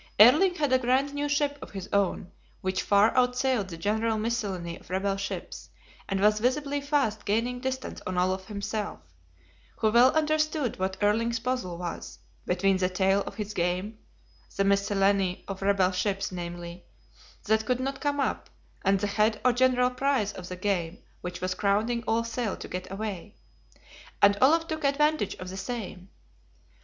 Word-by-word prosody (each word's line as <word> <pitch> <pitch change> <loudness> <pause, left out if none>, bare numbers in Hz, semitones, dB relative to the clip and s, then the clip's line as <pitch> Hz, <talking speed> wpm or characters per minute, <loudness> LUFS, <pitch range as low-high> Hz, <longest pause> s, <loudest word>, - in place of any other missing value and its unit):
Erling 305 - +7
had 290 -5 0
a 260 - +5
grand 260 +3 +1
new 290 0 -2
ship 285 0 0
of - - -8
his 195 -1 -7
own, 195 -2 0 0.3
which 185 0 -1
far 205 +2 +4
outsailed 250 -3 +2
the 170 -3 -8
general 220 +5 0
miscellany 200 -7 -2
of - - -20
rebel 195 +2 0
ships, 195 0 -6 0.4
and 195 -1 0
was 210 +1 +4
visibly 280 +4 0
fast 280 -7 0
gaining 235 +4 0
distance 260 0 -4
on 185 -1 -3
Olaf 185 +1 0
himself, 210 - -4 0.8
who 220 -1 +1
well 245 +3 +6
understood 310 - 0
what 190 0 -1
Erling's 230 +3 +2
puzzle 230 -7 -3
was, 175 -1 -6 0.3
between 190 +1 +2
the 185 -1 +1
tail 195 +1 +2
of - - -7
his 210 -1 -5
game 185 +4 -2 0.6
(the 195 - +3
miscellany 195 -1 +2
of 195 -1 -6
rebel 195 -2 +3
ships, 195 +1 -1
namely) 175 0 -7 0.6
that 220 +1 +1
could 250 -1 +1
not 270 +1 -3
come 290 -1 0
up, - - -1 0.3
and 195 0 +3
the - - +1
head 210 +1 +1
or 250 - +5
general 250 0 +3
prize 255 -5 0
of 180 -1 -9
the 180 - -5
game 180 -3 -1 0.2
which 180 0 -6
was 185 0 -1
crowding 215 +4 +1
all 230 +1 +2
sail 230 -2 -3
to - - -8
get 185 +1 -6
away; 205 -1 -5 0.8
and 200 0 +6
Olaf 325 +5 +5
took 315 -1 -4
advantage 290 -4 +1
of 185 - -8
the 190 - -7
same. 195 -3 -6
210 Hz, 170 wpm, -27 LUFS, 190-250 Hz, 0.8 s, Erling